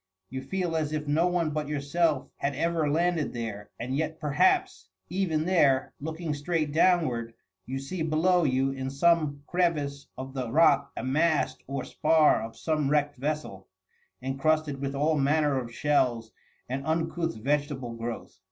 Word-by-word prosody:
You 130 Hz, 0 st, -4 dB
feel 175 Hz, +3 st, -2 dB
as 155 Hz, -1 st, -1 dB
if 150 Hz, -1 st, -3 dB
no 160 Hz, +4 st, +3 dB
one 175 Hz, -3 st, 0 dB
but 150 Hz, -1 st, -2 dB
yourself 150 Hz, 0 st, 0 dB
had 140 Hz, 0 st, -2 dB
ever 165 Hz, 0 st, 0 dB
landed 170 Hz, 0 st, +1 dB
there; 110 Hz, -4 st, -5 dB
and 125 Hz, +3 st, -3 dB
yet, 160 Hz, +2 st, -2 dB
perhaps, 370 Hz, -, +1 dB, 0.2 s
even 165 Hz, -5 st, 0 dB
there, 145 Hz, -8 st, +3 dB
looking 160 Hz, +1 st, -3 dB
straight 155 Hz, +1 st, -1 dB
downward, 140 Hz, -10 st, +2 dB, 0.3 s
you 130 Hz, +2 st, -3 dB
see 150 Hz, +6 st, -5 dB
below 165 Hz, +3 st, +2 dB
you 135 Hz, -1 st, +2 dB
in 135 Hz, -1 st, -4 dB
some 145 Hz, 0 st, +2 dB
crevice 150 Hz, -6 st, -1 dB
of 130 Hz, 0 st, -7 dB
the 130 Hz, -4 st, -3 dB
rock 145 Hz, -1 st, +4 dB
a -, -, -3 dB
mast 155 Hz, +4 st, +1 dB
or 135 Hz, -1 st, -3 dB
spar 155 Hz, 0 st, +3 dB
of 115 Hz, 0 st, -7 dB
some 155 Hz, -3 st, 0 dB
wrecked 145 Hz, -1 st, +1 dB
vessel, 140 Hz, -9 st, -4 dB, 0.6 s
encrusted 145 Hz, +1 st, 0 dB
with 140 Hz, 0 st, -3 dB
all 150 Hz, +2 st, +2 dB
manner 145 Hz, 0 st, +2 dB
of 120 Hz, -2 st, -6 dB
shells 120 Hz, -4 st, +1 dB, 0.4 s
and 130 Hz, +2 st, -3 dB
uncouth 165 Hz, +1 st, -1 dB
vegetable 140 Hz, 0 st, -1 dB
growth. 115 Hz, -4 st, -6 dB
150 Hz, 155 wpm, -28 LUFS, 135-160 Hz, 0.6 s, rock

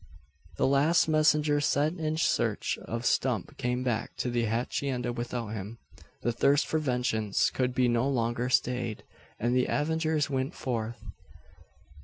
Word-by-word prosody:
The -, -, +2 dB
last 140 Hz, +6 st, +3 dB
messenger 150 Hz, -1 st, +3 dB
sent 150 Hz, +4 st, +1 dB
in 155 Hz, 0 st, -1 dB
search 165 Hz, -, 0 dB
of 115 Hz, +1 st, -4 dB
Stump 125 Hz, -7 st, 0 dB
came 125 Hz, +1 st, -1 dB
back 120 Hz, -3 st, -2 dB
to 125 Hz, -, -2 dB
the 120 Hz, -1 st, +1 dB
hacienda 125 Hz, +2 st, -1 dB
without 120 Hz, -1 st, -4 dB
him. 105 Hz, +1 st, -6 dB, 0.5 s
The 120 Hz, -, +1 dB
thirst 140 Hz, +5 st, +3 dB
for 160 Hz, -, 0 dB
vengeance 125 Hz, -7 st, 0 dB
could 125 Hz, -1 st, -1 dB
be 125 Hz, -1 st, +3 dB
no 120 Hz, +3 st, +2 dB
longer 120 Hz, -1 st, 0 dB
stayed, 125 Hz, -3 st, 0 dB, 0.4 s
and 120 Hz, +2 st, +1 dB
the 125 Hz, -, +2 dB
avengers 155 Hz, 0 st, 0 dB
went 135 Hz, +3 st, -2 dB
forth. 115 Hz, -2 st, -3 dB
125 Hz, 145 wpm, -29 LUFS, 120-145 Hz, 0.5 s, last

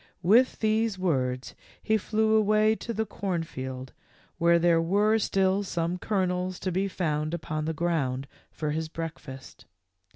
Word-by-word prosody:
With 230 Hz, +9 st, +4 dB
these 220 Hz, -1 st, +1 dB
words 130 Hz, -8 st, -1 dB, 0.3 s
he 220 Hz, -, +2 dB
flew 220 Hz, +1 st, +1 dB
away 215 Hz, 0 st, +4 dB
to 235 Hz, -, -6 dB
the 220 Hz, 0 st, -1 dB
corn 185 Hz, -5 st, -3 dB
field 130 Hz, -3 st, -7 dB, 0.5 s
where 170 Hz, 0 st, +5 dB
there 170 Hz, -1 st, +3 dB
were 205 Hz, +6 st, +2 dB
still 195 Hz, -1 st, +1 dB
some 175 Hz, -2 st, -2 dB
kernels 185 Hz, -2 st, -1 dB
to 185 Hz, -, -1 dB
be 190 Hz, +3 st, 0 dB
found 155 Hz, -4 st, -1 dB
upon 155 Hz, -2 st, -4 dB
the 160 Hz, -, -1 dB
ground 140 Hz, -6 st, 0 dB, 0.2 s
for 150 Hz, -1 st, -3 dB
his 160 Hz, +1 st, -3 dB
breakfast. 155 Hz, -5 st, -8 dB
175 Hz, 150 wpm, -27 LUFS, 155-205 Hz, 0.5 s, where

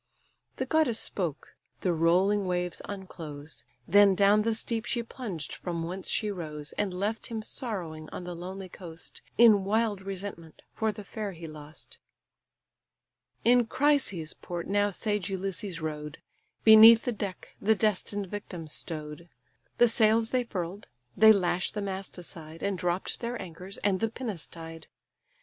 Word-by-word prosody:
The -, -, -2 dB
goddess 310 Hz, -8 st, +2 dB
spoke: 165 Hz, -, -3 dB, 0.3 s
the 180 Hz, -, +1 dB
rolling 185 Hz, +5 st, +3 dB
waves 180 Hz, -1 st, -1 dB
unclose; 160 Hz, -7 st, -8 dB, 0.2 s
Then 200 Hz, +1 st, +6 dB
down 200 Hz, +2 st, +5 dB
the 225 Hz, +1 st, +1 dB
steep 225 Hz, +1 st, -2 dB
she 235 Hz, -1 st, -1 dB
plunged 215 Hz, -, -6 dB
from 170 Hz, -2 st, -4 dB
whence 185 Hz, +3 st, -4 dB
she 210 Hz, -1 st, 0 dB
rose, 150 Hz, -5 st, -5 dB
And 205 Hz, -2 st, -1 dB
left 205 Hz, +5 st, -2 dB
him 220 Hz, -2 st, -4 dB
sorrowing 175 Hz, -, -4 dB
on -, -, -7 dB
the 175 Hz, 0 st, -5 dB
lonely 185 Hz, +3 st, -7 dB
coast, 170 Hz, -2 st, -11 dB, 0.2 s
In 220 Hz, -4 st, +7 dB
wild 210 Hz, 0 st, +1 dB
resentment 190 Hz, -4 st, -6 dB
for 220 Hz, -1 st, 0 dB
the 210 Hz, 0 st, -9 dB
fair 205 Hz, -1 st, -5 dB
he 165 Hz, -1 st, -9 dB
lost. 155 Hz, 0 st, -11 dB, 1.5 s
In 240 Hz, 0 st, +5 dB
Chrysa's 260 Hz, -, +1 dB
port 175 Hz, -1 st, -6 dB
now 205 Hz, +1 st, +2 dB
sage 205 Hz, -1 st, -2 dB
Ulysses 190 Hz, -2 st, -3 dB
rode; 150 Hz, -1 st, -5 dB, 0.5 s
Beneath 220 Hz, +1 st, +9 dB
the 245 Hz, -, +1 dB
deck 200 Hz, -4 st, -5 dB
the 220 Hz, +2 st, +4 dB
destined 205 Hz, -1 st, 0 dB
victims 180 Hz, -5 st, -7 dB
stow'd: 155 Hz, +1 st, -5 dB, 0.5 s
The 240 Hz, -, +6 dB
sails 225 Hz, 0 st, +3 dB
they 250 Hz, -1 st, +1 dB
furl'd, 185 Hz, -2 st, -5 dB, 0.3 s
they 220 Hz, +2 st, +8 dB
lash 180 Hz, -3 st, +2 dB
the 210 Hz, -, -5 dB
mast 195 Hz, -1 st, -5 dB
aside, 165 Hz, -2 st, -8 dB
And 200 Hz, -1 st, 0 dB
dropp'd 180 Hz, +1 st, -2 dB
their 235 Hz, 0 st, -3 dB
anchors, 185 Hz, +2 st, -8 dB
and 195 Hz, -2 st, +2 dB
the 225 Hz, -, +1 dB
pinnace 220 Hz, -8 st, -5 dB
tied. 165 Hz, -1 st, -10 dB
195 Hz, 150 wpm, -29 LUFS, 170-215 Hz, 1.5 s, Beneath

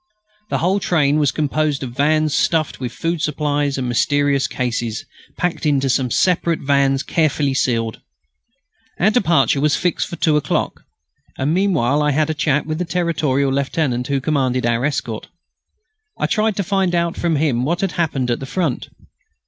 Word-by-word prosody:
The -, -, 0 dB
whole 185 Hz, +4 st, +1 dB
train 155 Hz, -6 st, +2 dB
was 145 Hz, -3 st, +2 dB
composed 150 Hz, -1 st, -1 dB
of 125 Hz, -, -5 dB
vans 155 Hz, +3 st, +1 dB
stuffed 155 Hz, 0 st, +1 dB
with 125 Hz, -3 st, -4 dB
food 165 Hz, +5 st, -2 dB
supplies 145 Hz, -2 st, -1 dB
and 130 Hz, -2 st, -2 dB
mysterious 140 Hz, +3 st, +1 dB
cases, 120 Hz, -3 st, -3 dB, 0.3 s
packed 180 Hz, -1 st, -2 dB
into 140 Hz, -3 st, +1 dB
some 130 Hz, 0 st, 0 dB
separate 170 Hz, +2 st, +1 dB
vans 140 Hz, -1 st, +2 dB
carefully 150 Hz, -3 st, +1 dB
sealed. 115 Hz, -4 st, -1 dB, 1.0 s
Our 205 Hz, +4 st, +4 dB
departure 170 Hz, -, +2 dB
was 150 Hz, -1 st, +3 dB
fixed 175 Hz, -2 st, -1 dB
for -, -, -6 dB
two 155 Hz, -3 st, +2 dB
o'clock, 150 Hz, -, -2 dB, 0.5 s
and 140 Hz, +4 st, 0 dB
meanwhile 150 Hz, -8 st, +2 dB
I 150 Hz, -1 st, +2 dB
had 155 Hz, +2 st, +1 dB
a -, -, -1 dB
chat 150 Hz, -1 st, 0 dB
with 155 Hz, +1 st, -3 dB
the -, -, 0 dB
Territorial 160 Hz, -6 st, 0 dB
lieutenant 135 Hz, -2 st, -1 dB
who 140 Hz, -1 st, 0 dB
commanded 130 Hz, -3 st, 0 dB
our 120 Hz, +1 st, +1 dB
escort. 120 Hz, -6 st, -3 dB, 0.9 s
I -, -, 0 dB
tried 215 Hz, -1 st, +1 dB
to 200 Hz, -, -1 dB
find 190 Hz, -1 st, 0 dB
out 170 Hz, 0 st, 0 dB
from 170 Hz, -2 st, 0 dB
him 140 Hz, -5 st, +1 dB
what 170 Hz, +7 st, -1 dB
had 195 Hz, -2 st, 0 dB
happened 135 Hz, -7 st, -1 dB
at 120 Hz, -, -1 dB
the 135 Hz, -, -7 dB
Front. 165 Hz, -5 st, -2 dB
145 Hz, 170 wpm, -19 LUFS, 135-165 Hz, 1.0 s, Our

